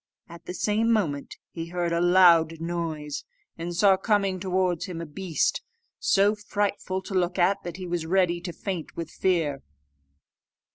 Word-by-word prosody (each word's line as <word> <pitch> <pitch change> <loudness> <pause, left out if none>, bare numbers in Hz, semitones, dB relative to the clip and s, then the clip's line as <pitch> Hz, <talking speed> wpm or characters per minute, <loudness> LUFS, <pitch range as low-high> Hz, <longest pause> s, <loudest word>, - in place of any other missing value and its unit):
At 170 0 -13
the 180 - -5
same 220 +4 +1
moment 160 -11 -1 0.2
he 165 -1 -6
heard 175 0 -2
a 170 - +1
loud 170 -3 +5
noise, 165 -3 -4 0.3
and 170 +1 -5
saw 195 +1 +5
coming 195 -2 +1
towards 185 -1 0
him 180 -4 -6
a 170 - -4
beast, 165 +1 -1 0.4
so 200 +1 +3
frightful 205 -2 -2
to 195 - -7
look 180 -1 0
at 190 +2 +3
that 175 -1 -7
he 185 - -6
was 170 -2 -3
ready 175 -1 +2
to 175 0 -5
faint 180 -2 -5
with 165 -1 -5
fear. 160 -7 0
175 Hz, 160 wpm, -26 LUFS, 165-190 Hz, 0.4 s, loud